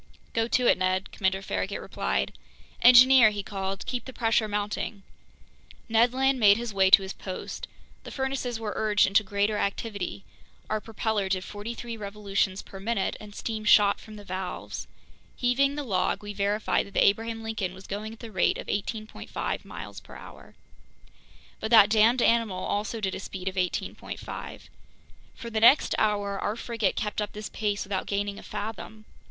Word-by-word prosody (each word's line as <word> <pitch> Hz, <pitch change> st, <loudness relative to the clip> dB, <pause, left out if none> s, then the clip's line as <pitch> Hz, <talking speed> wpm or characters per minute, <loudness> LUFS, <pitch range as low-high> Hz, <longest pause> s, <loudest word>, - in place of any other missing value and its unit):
"Go 225 Hz, 0 st, +1 dB
to 250 Hz, +1 st, +1 dB
it, 190 Hz, -, +4 dB
Ned," 185 Hz, +1 st, 0 dB
Commander 190 Hz, 0 st, -1 dB
Farragut 95 Hz, -, -2 dB
replied. 65 Hz, +1 st, -2 dB, 0.5 s
"Engineer," 250 Hz, -1 st, +8 dB
he 205 Hz, -1 st, -4 dB
called, 195 Hz, -1 st, -4 dB
"keep 250 Hz, -1 st, -3 dB
the 260 Hz, -, -7 dB
pressure 225 Hz, -2 st, +1 dB
mounting!" 205 Hz, 0 st, -3 dB, 0.8 s
Ned 230 Hz, +1 st, +4 dB
Land 265 Hz, +1 st, +2 dB
made 205 Hz, -2 st, +6 dB
his 235 Hz, -2 st, -4 dB
way 190 Hz, -1 st, +4 dB
to 195 Hz, -, +8 dB
his 190 Hz, -, -5 dB
post. 185 Hz, -2 st, -6 dB, 0.4 s
The -, -, -8 dB
furnaces 265 Hz, -3 st, -3 dB
were 215 Hz, -2 st, -3 dB
urged 210 Hz, -2 st, +3 dB
into 195 Hz, +3 st, +4 dB
greater 205 Hz, +1 st, 0 dB
activity; 200 Hz, -2 st, -3 dB, 0.5 s
our 215 Hz, 0 st, 0 dB
propeller 220 Hz, -3 st, -2 dB
did 185 Hz, -1 st, 0 dB
forty 210 Hz, +4 st, -6 dB
three 235 Hz, -1 st, -6 dB
revolutions 200 Hz, -2 st, -2 dB
per 195 Hz, -, -11 dB
minute, 205 Hz, 0 st, -1 dB
and 210 Hz, -1 st, -11 dB
steam 220 Hz, -2 st, -4 dB
shot 205 Hz, -1 st, +5 dB
from 215 Hz, -, -12 dB
the 205 Hz, -, -10 dB
valves. 185 Hz, -1 st, -5 dB, 0.5 s
Heaving 275 Hz, +3 st, +2 dB
the 295 Hz, -, -3 dB
log, 195 Hz, -5 st, 0 dB
we 205 Hz, 0 st, -6 dB
verified 205 Hz, +1 st, 0 dB
that 200 Hz, -, -16 dB
the -, -, +5 dB
Abraham 225 Hz, +2 st, +1 dB
Lincoln 220 Hz, -5 st, -3 dB
was 190 Hz, 0 st, -12 dB
going 210 Hz, +2 st, -5 dB
at 225 Hz, -, -13 dB
the 230 Hz, -2 st, -8 dB
rate 185 Hz, -3 st, +2 dB
of -, -, -6 dB
18.5 215 Hz, +1 st, -4 dB
miles -, -, -8 dB
per -, -, -14 dB
hour. -, -, -13 dB, 1.0 s
But 220 Hz, -, -3 dB
that 215 Hz, -3 st, +7 dB
damned 225 Hz, +3 st, +4 dB
animal 225 Hz, -5 st, +2 dB
also 210 Hz, +2 st, -2 dB
did 190 Hz, -2 st, -1 dB
a -, -, -4 dB
speed 190 Hz, -1 st, -7 dB
of 190 Hz, -, -1 dB
18.5. 180 Hz, -1 st, -4 dB, 0.7 s
For 235 Hz, -, -8 dB
the 220 Hz, -, 0 dB
next 235 Hz, +6 st, +6 dB
hour 205 Hz, -2 st, 0 dB
our 210 Hz, -, -1 dB
frigate 230 Hz, -4 st, -1 dB
kept 210 Hz, 0 st, -2 dB
up 210 Hz, -, -4 dB
this 210 Hz, 0 st, -6 dB
pace 205 Hz, -2 st, -2 dB
without 195 Hz, -1 st, -3 dB
gaining 200 Hz, 0 st, -2 dB
a -, -, -10 dB
fathom! 215 Hz, +1 st, -7 dB
210 Hz, 175 wpm, -27 LUFS, 195-225 Hz, 1.0 s, Engineer